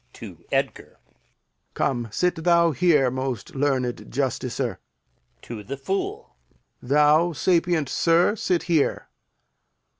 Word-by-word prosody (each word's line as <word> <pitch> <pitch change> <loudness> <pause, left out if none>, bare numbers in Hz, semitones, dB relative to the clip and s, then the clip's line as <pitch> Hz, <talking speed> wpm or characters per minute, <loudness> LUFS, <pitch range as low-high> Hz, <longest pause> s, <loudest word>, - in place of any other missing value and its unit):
[To - - -11
Edgar] - - -2 0.8
Come, 120 -3 -1
sit 170 - -1
thou 170 -1 +4
here, 150 -5 +3
most 130 -2 -4
learned 135 -3 -1
justicer. 125 -1 -2 0.6
[To 115 -3 -7
the 135 +6 -6
Fool] 190 - -4 0.5
Thou, 150 +5 +3
sapient 170 -2 +1
sir, 170 - +2
sit 180 -4 0
here. 165 -5 0
145 Hz, 100 wpm, -24 LUFS, 130-170 Hz, 0.8 s, thou